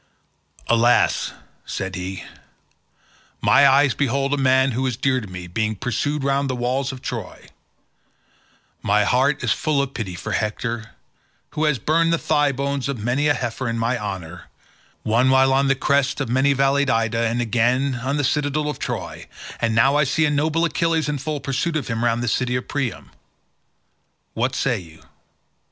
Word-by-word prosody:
"Alas," 120 +1 +3 0.3
said 95 -1 -5
he, 95 0 -5 1.2
"my 140 - +5
eyes 135 -1 +4
behold 140 0 0
a - - +3
man 130 0 +3
who 130 +3 -1
is 125 -4 -2
dear 130 -1 +1
to 105 - -8
me 90 -1 -8
being 110 +5 -2
pursued 135 +7 -2
round 140 0 0
the 130 - -1
walls 125 +2 -1
of 130 -1 -10
Troy; - - -6 1.3
my 105 +1 +2
heart 135 +6 +1
is 120 - +1
full 150 +4 0
of 140 -1 -1
pity 95 -6 -5
for - - -6
Hector, 110 +1 -3 0.6
who 155 - -1
has 150 -3 +2
burned 165 +5 +1
the 165 - +3
thigh 145 -3 +1
bones 140 0 -2
of 140 - -2
many 120 +7 0
a 145 - +3
heifer 120 0 -3
in 115 - -2
my 115 +2 0
honour, 95 -6 -6 0.6
one 120 +4 +2
while 130 0 +4
on 135 +1 +2
the 135 - +3
crests 140 0 +1
of - - -2
many 135 +3 +3
valleyed 135 +1 +2
Ida, 115 0 +1
and 115 +2 -1
again 120 +4 +1
on 135 +4 -1
the 145 - 0
citadel 150 +2 0
of - - -10
Troy; - - -5 0.3
and 115 -1 0
now 135 +5 +4
I 150 - +4
see 150 +3 +1
noble 155 +3 +1
Achilles 165 0 0
in 145 -1 -2
full 150 +2 -3
pursuit 140 +5 -2
of 145 -5 -2
him 115 0 -2
round 120 0 +1
the - - -2
city 125 +2 0
of 125 - -3
Priam. 140 -5 -4 1.2
What 125 +3 -1
say 125 -5 0
you? 80 -3 -15
130 Hz, 175 wpm, -22 LUFS, 115-140 Hz, 1.3 s, my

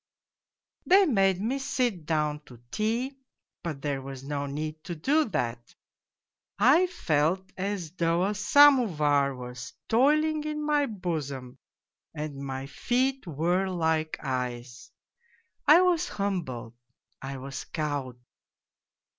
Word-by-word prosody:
They 385 +2 +6
made 195 - +2
me 240 +7 -1
sit 240 - -1
down 150 -2 0
to 120 -2 -14
tea, 240 +6 -1 0.4
but 155 -5 -5
there 140 -2 -1
was 135 -1 -8
no 140 0 -3
need 155 +2 -5
to 175 - -4
do 295 - +2
that: 120 - -3 0.8
I 275 - +5
felt 185 - 0
as 190 -4 -3
though 170 0 +1
a 205 - 0
samovar 195 - +4
was 125 +2 -8 0.2
toiling 300 +6 +3
in 300 0 -3
my 295 -1 +2
bosom 150 - -5 0.6
and 150 -2 -5
my 135 -1 -5
feet 255 - -1
were 175 +5 0
like 160 -3 0
ice. 125 -1 -4 0.8
I 310 +5 +8
was 355 -2 +2
humbled, 175 - -3 0.5
I 135 0 -5
was 135 +1 -6
cowed. 145 -5 -3
165 Hz, 120 wpm, -27 LUFS, -, 0.8 s, I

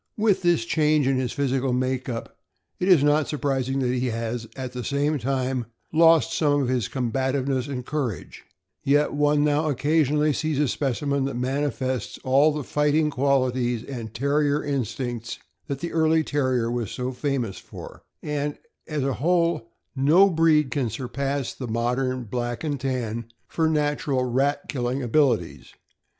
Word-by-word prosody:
With 210 -3 +2
this 175 -10 +2
change 150 +1 +2
in 135 0 +2
his 130 -2 -1
physical 135 -2 0
make 130 +1 -1
up, 115 -2 -5 0.4
it 180 - 0
is 175 -7 +6
not 150 +1 +3
surprising 135 -3 -1
that 125 -1 +1
he 130 0 0
has, 115 0 -3
at 130 -2 -5
the 125 -1 -5
same 145 +2 0
time, 130 -2 -1 0.3
lost 165 0 +5
some 145 -2 +2
of 125 - -1
his 125 -5 0
cornbativehess 130 +1 -1
and 130 -3 -5
courage; 135 -10 -4 0.4
yet 145 +2 +2
one 145 0 +2
now 150 +1 +2
occasionally 150 +1 +2
sees 155 0 -1
a 150 0 +2
specimen 140 +1 -1
that 135 - -3
manifests 130 -2 -2
all 140 +4 +4
the 150 -1 -3
fighting 150 +2 +1
qualities 130 -3 +1
and 115 -5 -7
Terrier 145 +3 +1
instincts 120 -3 -3 0.3
that 140 -2 -4
the 170 - -3
early 160 0 +3
Terrier 130 -6 0
was 120 -4 -2
so 125 +1 -3
famous 130 -6 -2
for, - - -11 0.2
and, 150 0 -2 0.3
as 150 -3 -2
a 135 0 0
whole, 170 -7 +1 0.3
no 165 +9 +5
breed 155 -4 +3
can 130 -3 0
surpass 135 +3 -3
the 125 - -6
modern 125 +3 -1
Black 120 +1 -4
and 145 -3 -2
Tan 120 -3 -3 0.2
for 160 -1 0
natural 145 -3 0
rat 135 +4 +1
killing 125 0 -2
abilities. 135 +3 0
135 Hz, 155 wpm, -24 LUFS, 125-150 Hz, 0.4 s, is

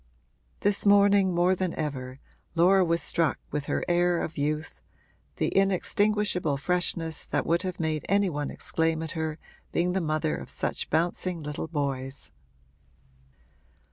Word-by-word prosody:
This 205 0 +2
morning, 200 -1 +5
more 175 +1 +3
than 185 -2 -2
ever, 135 -4 -4 0.4
Laura 185 +3 +5
was 170 -1 0
struck 165 -2 +1
with 150 -1 -2
her - - -1
air 175 0 +2
of 160 - -5
youth, 150 +2 -2 0.5
the - - 0
inextinguishable 195 -4 +1
freshness 165 0 -1
that - - -1
would 170 +1 +2
have 185 -2 -4
made 155 -2 -1
any 200 +1 +3
one 145 -4 -3
exclaim 160 0 -1
at 160 - -4
her 160 -1 -3 0.3
being 180 +1 +1
the 190 - 0
mother 155 - 0
of 70 -1 -8
such - - -3
bouncing 170 +1 0
little 150 +2 -4
boys. 140 -3 -3
165 Hz, 140 wpm, -27 LUFS, 150-185 Hz, 0.5 s, morning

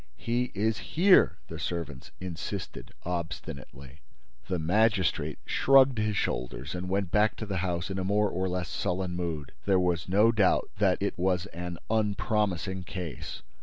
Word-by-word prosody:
"He 120 - -1
is 105 +1 +1
here," 180 - +4
the 80 - -7
servants 80 -5 -4
insisted, 90 -3 -6
obstinately. 75 -5 -6 0.5
The 90 - 0
magistrate 95 +2 +2
shrugged 135 -3 +5
his 105 -1 0
shoulders 65 -1 -2
and 90 0 -4
went 95 -2 0
back 105 +1 +3
to 110 - -5
the 100 -2 -3
house 90 0 -2
in 95 - -2
a - - -1
more 105 +2 +2
or 95 +1 -1
less 90 0 -2
sullen 90 0 -2
mood. 80 -5 -3
There 95 -2 +4
was 90 -2 0
no 105 +5 +5
doubt 105 -5 +2
that - - +3
it - - -2
was 90 0 +1
an 85 0 -5
unpromising 105 -3 0
case. 90 -3 -6
90 Hz, 155 wpm, -29 LUFS, 85-105 Hz, 0.5 s, shrugged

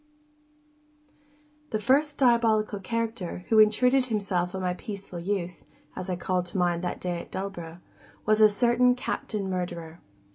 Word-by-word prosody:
The 215 - 0
first 285 +6 +2
diabolical 225 -5 +3
character 225 -4 -3
who 220 - +5
intruded 250 +5 +4
himself 195 -5 -1
on 190 - -3
my 180 -1 0
peaceful 195 -3 -7
youth 180 -1 -3 0.3
(as 185 +1 -6
I 180 - 0
called 180 0 -1
to 175 - -5
mind 175 -1 +1
that 175 - -3
day 175 -1 -3
at - - -13
Dullborough), 175 -3 -6 0.4
was 215 0 +3
a 215 - +8
certain 240 +3 +3
Captain 210 -5 -3
Murderer. 175 -3 -4
200 Hz, 145 wpm, -27 LUFS, 180-230 Hz, 0.4 s, a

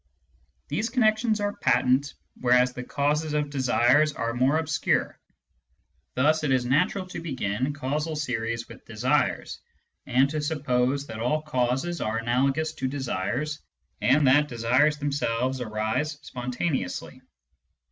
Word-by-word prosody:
These 225 +2 -1
connections 220 -2 +2
are 205 0 -1
patent, 130 +3 +2 0.2
whereas 125 0 +3
the 125 - -6
causes 150 +3 -1
of 150 -1 -1
desires 135 +2 +3
are 115 -2 -2
more 130 +5 +2
obscure. 160 -1 0 1.0
Thus 155 +5 +2
it 145 - +1
is 130 -2 +2
natural 150 +9 +1
to - - -6
begin 130 -4 -2
causal 150 +3 -2
series 115 -5 -2
with - - -13
desires, 125 +7 -1 0.5
to 140 +4 +2
suppose 140 -3 0
that 110 -4 -8
all 150 +7 0
causes 135 +4 -1
are 110 +1 -1
analogous 135 +7 0
to 130 - -3
desires, 130 +2 -2 0.4
and 140 +3 +4
that 145 +3 +5
desires 125 +5 +2
themselves 130 -3 -1
arise 110 +7 -1
spontaneously. 125 - -3
135 Hz, 125 wpm, -26 LUFS, 125-150 Hz, 1.0 s, that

